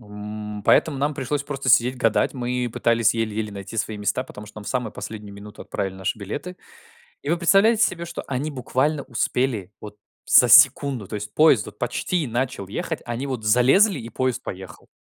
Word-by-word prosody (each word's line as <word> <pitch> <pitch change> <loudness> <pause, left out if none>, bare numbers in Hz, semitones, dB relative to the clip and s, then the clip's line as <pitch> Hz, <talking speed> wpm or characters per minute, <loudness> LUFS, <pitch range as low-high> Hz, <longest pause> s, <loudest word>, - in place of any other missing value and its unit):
М, 105 0 -8
поэтому 150 -4 +3
нам 145 +2 0
пришлось 140 +2 -2
просто 140 -2 -4
сидеть, 125 +1 +4
гадать, 115 +2 +1
мы 125 -1 -2
пытались 115 -2 +2
еле-еле 110 -2 -2
найти 100 +2 -8
свои 110 0 -2
места, 105 +5 -1
потому 105 -4 -11
что 105 - -16
нам 105 - -10
в - - -6
самую 125 -4 -2
последнюю 105 -2 -8
минуту 105 +1 -11
отправили 95 -1 -4
наши 95 +3 -3
билеты. 145 - -6 0.7
И 140 - -3
вы 170 - +2
представляете 205 +6 +4
себе, 170 -5 -3
что 170 0 -6
они 140 +3 -3
буквально 140 +2 -1
успели 120 -5 -2
вот 105 -1 -10 0.3
за - - +6
секунду, 130 -8 +5
то - - -8
есть 105 0 -5
поезд 150 -9 +4
вот 105 0 -12
почти 145 +7 -1
начал 120 -3 -3
ехать, 100 - -4
они 120 +3 -3
вот 130 -5 -4
залезли, 130 - +4
и 115 - -8
поезд 130 -2 -2
поехал. 95 -3 -9
120 Hz, 190 wpm, -23 LUFS, 105-140 Hz, 0.7 s, за